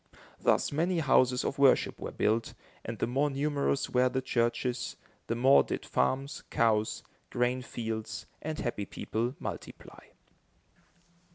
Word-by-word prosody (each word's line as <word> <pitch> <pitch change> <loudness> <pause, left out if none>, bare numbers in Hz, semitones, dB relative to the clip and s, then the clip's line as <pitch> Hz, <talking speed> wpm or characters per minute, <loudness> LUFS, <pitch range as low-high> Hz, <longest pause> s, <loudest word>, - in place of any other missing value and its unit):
Thus - - +2
many 170 +5 +1
houses 130 -4 +3
of 140 - -2
worship 140 -2 +4
were - - -4
built, 110 +2 0 0.3
and - - -5
the - - 0
more 135 +5 +1
numerous 140 0 0
were 125 0 +3
the 130 - -1
churches, 120 0 -1 0.3
the 115 - -1
more 130 +4 +6
did - - -4
farms, 135 +2 0
cows, 110 -3 +1 0.3
grain 125 +1 0
fields, 110 -3 -5 0.2
and 155 0 -4
happy 110 -4 -3
people 120 +6 -3
multiply. - - -8
125 Hz, 130 wpm, -30 LUFS, 120-140 Hz, 0.3 s, more